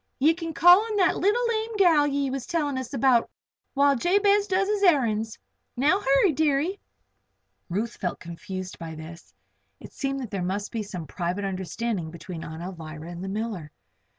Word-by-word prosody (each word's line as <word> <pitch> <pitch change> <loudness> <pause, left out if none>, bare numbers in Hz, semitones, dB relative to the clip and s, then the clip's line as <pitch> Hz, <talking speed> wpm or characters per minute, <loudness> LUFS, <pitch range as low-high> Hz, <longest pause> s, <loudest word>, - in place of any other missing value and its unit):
Ye 300 +4 +4
can 330 -2 -6
call 355 +4 +8
on 445 -1 -4
that 370 -2 +3
leetle 450 +6 +2
lame 445 0 -2
gal 325 -7 +5
ye 280 -1 -1
was 265 -2 -4
tellin' 300 -5 -1
us 255 -2 -6
about 255 -3 +3 0.5
while 280 0 +4
Jabez 400 - +3
does 390 0 +1
his 415 -1 0
errands. 230 - +2 0.4
Now 300 +10 +3
hurry, 275 +2 +3
deary." 310 +5 +1 0.9
Ruth 215 +7 -2
felt 180 - -2
quite 170 - -11
confused 185 +2 -7
by 165 -1 -7
this. 165 +2 -11 0.5
It - - -12
seemed 275 -1 -2
that 240 - -7
there 195 -3 -2
must 195 +3 -3
be 225 - -2
some 185 -5 -6
private 175 +6 -3
understanding 190 -1 -3
between 165 +1 -8
Aunt 160 +1 -7
Alvirah 165 -2 -8
and 175 +1 -7
the 190 - -4
miller. 205 -6 -4
250 Hz, 180 wpm, -26 LUFS, -, 0.9 s, call